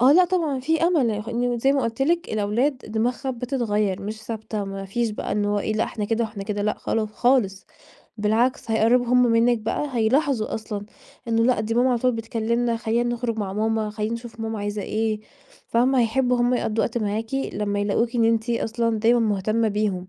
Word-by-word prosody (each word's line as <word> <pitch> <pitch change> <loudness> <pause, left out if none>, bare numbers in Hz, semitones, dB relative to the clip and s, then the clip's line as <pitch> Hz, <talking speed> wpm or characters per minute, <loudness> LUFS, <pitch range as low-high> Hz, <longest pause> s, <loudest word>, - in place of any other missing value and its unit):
آه، 260 +3 +7
لأ 360 +3 +6
طبعًا 330 -7 0
في 320 +4 0
أمل،- 315 -9 +3 0.2
إن 240 0 -1
زي 270 +4 +3
ما 275 -2 +1
قلت 230 +3 -1
لِك- 340 +4 +1
الأولاد 225 +7 0
دماغها 245 +4 -2
بتتغيّر 230 -6 -1
مش 215 +2 -6
ثابتة. 220 -2 -4
ما 195 0 -6
فيش 225 +3 -1
بقى 210 - -4
إن 205 0 0
هو 205 0 +1
إيه 215 - -1
لأ 215 - +1
إحنا 210 -2 -4
كده 225 +2 0
وإحنا 210 -2 -6
كده 205 0 -3
لأ 210 - +1
خال 215 -1 -1
خالص 215 -4 +1 0.5
بالعكس، 225 +3 +1
هيقربوا 235 +3 +3
همّ 250 +1 +4
منِك 235 0 +3
بقى 225 +7 -2
هيلاحظوا 235 0 +1
أصلًا 210 -2 -5 0.4
إنّه 230 0 +2
لأ، 245 -3 +3
دي 220 +1 -2
ماما 250 +2 +3
على 245 - +2
طول 250 +1 +2
بتكلمنا، 230 +1 -1
خلّينا 235 +1 0
نخرج 235 -2 -3
مع 200 -3 -2
ماما، 220 +1 0
خلّينا 215 +1 -2
نشوف 230 -1 -9
ماما 225 -1 -3
عايزة 205 0 -3
إيه، 215 0 -1 0.5
فاهمة؟ 250 +3 +3
هيحبوا 250 +2 +2
همّ 245 +1 +3
يقضوا 225 -2 0
وقت 235 +1 -2
معاكِ 220 +3 -2
لمّا 205 -6 -1
يلاقوكِ 230 +4 0
إن 230 - +3
أنتِ 225 +1 +1
أصًلا 230 -1 0
دايمًا 235 +2 +4
مهتمة 215 +1 +1
بيهم. 200 -3 -1
225 Hz, 195 wpm, -23 LUFS, 215-245 Hz, 0.5 s, آه